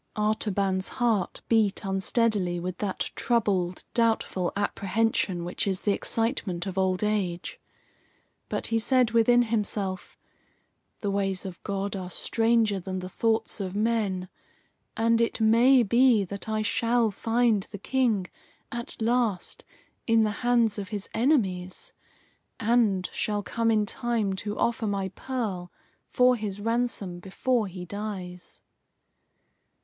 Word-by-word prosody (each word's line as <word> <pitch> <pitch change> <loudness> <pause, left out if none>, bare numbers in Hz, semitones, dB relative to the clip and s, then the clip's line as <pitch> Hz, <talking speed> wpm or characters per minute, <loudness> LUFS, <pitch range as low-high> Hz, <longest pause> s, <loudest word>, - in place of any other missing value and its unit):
Artaban's 200 -3 0
heart 230 -7 0
beat 215 -3 +2
unsteadily 195 -2 +1
with 180 +1 -5
that 200 -3 -3
troubled, 195 -7 0
doubtful 225 -6 +1
apprehension 200 -2 0
which 180 - -2
is 190 -2 -1
the 205 - +2
excitement 205 -5 -1
of 190 -2 -4
old 190 0 +1
age. 195 -5 -2 0.9
But - - -2
he 225 - +1
said 250 0 +3
within 240 +1 +5
himself: 205 -4 -2 0.8
"The 205 - -1
ways 195 -1 0
of 185 -3 -7
God 200 0 -3
are 185 -2 -5
stranger 225 +1 +1
than 185 +1 -5
the 185 0 -5
thoughts 225 +2 0
of 190 -1 -4
men, 210 -4 0 0.7
and 230 +1 +3
it 230 - 0
may 235 +4 +5
be 235 0 +4
that 200 +3 -6
I 215 0 0
shall 230 +1 +2
find 225 -1 +1
the 205 - -7
King, 225 -3 +1 0.5
at 235 -2 -5
last, 230 -4 0 0.4
in 225 -1 +4
the 215 -1 +2
hands 235 -3 +2
of 195 -2 -6
his 205 -2 -5
enemies, 190 -9 0 0.7
and 215 -5 +2
shall 205 -1 -1
come 230 +2 0
in 215 -2 +3
time 225 -3 0
to 205 +2 -4
offer 235 -1 0
my 195 -2 -1
pearl 195 -5 -4 0.4
for 250 0 +4
his 210 -3 -4
ransom 225 -5 -1
before 215 +5 0
he 180 -1 -8
dies." 185 -2 -7
210 Hz, 130 wpm, -27 LUFS, 190-230 Hz, 0.9 s, within